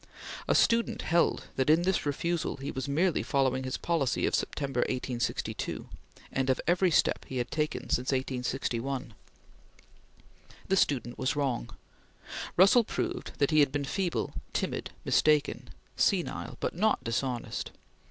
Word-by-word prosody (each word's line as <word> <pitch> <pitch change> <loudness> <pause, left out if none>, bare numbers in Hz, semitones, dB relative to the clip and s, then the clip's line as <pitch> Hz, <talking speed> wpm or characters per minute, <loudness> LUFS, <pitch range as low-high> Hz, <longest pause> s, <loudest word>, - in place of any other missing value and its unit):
A - - +3
student 230 0 +3
held 170 +1 +2
that, 130 +2 +2
in 160 +3 +5
this 185 -4 +1
refusal, 170 +4 -1
he 135 +1 -4
was 130 -1 -4
merely 170 +4 +2
following 130 -2 +1
his 130 - -2
policy 160 -7 0
of - - 0
September, 135 -3 -1
1862, 125 -1 -2 0.4
and 130 0 0
of 130 - +2
every 180 +2 +3
step 160 - +2
he 130 - -4
had 120 - -2
taken 150 -5 -1
since 125 +2 0
1861. 130 -1 -2 1.5
The 195 - +3
student 125 - +1
was 130 - 0
wrong. 130 -5 -1 0.9
Russell 195 +7 +7
proved 355 - -3
that 140 +1 +2
he 155 - +5
had 145 -2 +5
been 145 0 -1
feeble, 175 +3 -1 0.2
timid, - - -2 0.2
mistaken, 150 -2 +2 0.3
senile, - - 0
but - - -2
not 215 +5 +2
dishonest. 120 +1 -2
140 Hz, 140 wpm, -29 LUFS, 130-170 Hz, 1.5 s, Russell